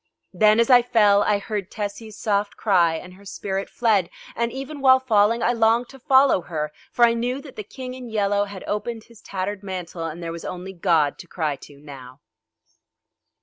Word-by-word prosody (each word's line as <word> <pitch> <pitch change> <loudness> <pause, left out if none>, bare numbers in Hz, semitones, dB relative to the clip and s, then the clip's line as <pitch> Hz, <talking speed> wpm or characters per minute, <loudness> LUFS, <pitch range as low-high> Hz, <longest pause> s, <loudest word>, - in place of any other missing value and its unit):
Then, 215 0 +4
as 235 +3 +3
I 245 -1 +8
fell, 210 -4 +4
I 210 0 +2
heard 205 -2 -4
Tessie's 210 +1 -6
soft 205 -1 -1
cry 175 -6 +3
and 180 +3 -8
her 195 +2 -17
spirit 195 0 -4
fled: 210 -7 +1 0.3
and 235 0 -1
even 275 +2 -7
while 260 -1 +6
falling 230 -2 +2
I 245 - +2
longed 230 +1 +2
to 270 - -14
follow 270 - +4
her, 150 -3 -4 0.2
for 240 - +5
I 230 - +3
knew 245 +3 -2
that 275 -3 -13
the - - -5
King 255 +4 -8
in 255 -2 -9
Yellow 205 -2 +1
had 200 -2 -9
opened 220 +2 -3
his 235 -2 -18
tattered 195 +1 -4
mantle 180 -4 -6
and 165 +2 -6
there 165 - -4
was 170 0 -7
only 185 +1 -6
God 165 -5 +1
to 175 - -10
cry 155 -4 -2
to 140 +1 -15
now. 135 -3 -12
205 Hz, 195 wpm, -23 LUFS, 180-235 Hz, 0.3 s, I